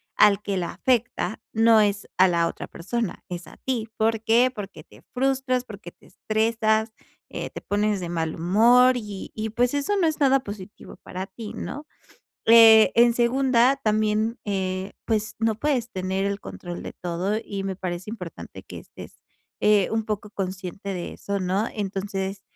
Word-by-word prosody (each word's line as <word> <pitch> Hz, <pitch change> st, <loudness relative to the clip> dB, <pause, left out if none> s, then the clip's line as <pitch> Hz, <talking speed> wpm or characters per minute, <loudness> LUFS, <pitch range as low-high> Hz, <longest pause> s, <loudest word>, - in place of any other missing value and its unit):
al 205 Hz, -1 st, +5 dB
que 200 Hz, -1 st, -3 dB
la 175 Hz, -, -2 dB
afecta 235 Hz, -6 st, 0 dB
no 225 Hz, 0 st, +5 dB
es 205 Hz, -1 st, 0 dB
a 185 Hz, +1 st, +6 dB
la 170 Hz, -1 st, +2 dB
otra -, -, -6 dB
persona, 220 Hz, +4 st, -4 dB
es 175 Hz, -1 st, -6 dB
a -, -, -14 dB
ti, 235 Hz, -4 st, -3 dB
¿por 220 Hz, 0 st, +1 dB
qué?, 240 Hz, +3 st, +4 dB
porque 205 Hz, -4 st, -8 dB
te -, -, -18 dB
frustras, 260 Hz, -1 st, 0 dB
porque 200 Hz, -6 st, -10 dB
te -, -, -23 dB
estresas, 220 Hz, 0 st, 0 dB, 0.4 s
eh, -, -, -5 dB
te -, -, -8 dB
pones 205 Hz, 0 st, 0 dB
de 175 Hz, -1 st, -5 dB
mal 160 Hz, -2 st, -2 dB
humor 235 Hz, +9 st, +5 dB
y 210 Hz, -4 st, -7 dB
y 220 Hz, 0 st, -3 dB
pues, 245 Hz, +4 st, +1 dB
eso 285 Hz, +9 st, 0 dB
no 345 Hz, -4 st, +3 dB
es 310 Hz, -, -2 dB
nada 270 Hz, -1 st, +4 dB
positivo 205 Hz, -4 st, -10 dB
para 185 Hz, +1 st, -6 dB
ti, 210 Hz, +3 st, -9 dB
¿no?, 295 Hz, +2 st, -6 dB, 0.6 s
eh, 225 Hz, -1 st, +8 dB
en 235 Hz, 0 st, +6 dB
segunda, 255 Hz, +1 st, +3 dB
también, 215 Hz, 0 st, 0 dB
eh, 190 Hz, -1 st, -2 dB
pues, 220 Hz, -1 st, -1 dB
no 225 Hz, -1 st, +1 dB
puedes 250 Hz, -1 st, -1 dB
tener 190 Hz, +1 st, -2 dB
el 200 Hz, 0 st, -2 dB
control 175 Hz, -2 st, -8 dB
de -, -, -7 dB
todo 180 Hz, +4 st, -2 dB
y 195 Hz, -1 st, -5 dB
me 195 Hz, -1 st, -3 dB
parece 185 Hz, +2 st, -5 dB
importante 180 Hz, -7 st, -8 dB
que -, -, -10 dB
estés, -, -, -13 dB, 0.4 s
eh, 210 Hz, -3 st, +4 dB
un 225 Hz, 0 st, 0 dB
poco 210 Hz, -1 st, -4 dB
consciente 190 Hz, 0 st, -5 dB
de 175 Hz, -2 st, -5 dB
eso, 200 Hz, 0 st, -4 dB
¿no?, 190 Hz, +4 st, 0 dB
entonces, 195 Hz, -1 st, -3 dB
210 Hz, 175 wpm, -24 LUFS, 190-230 Hz, 0.6 s, eh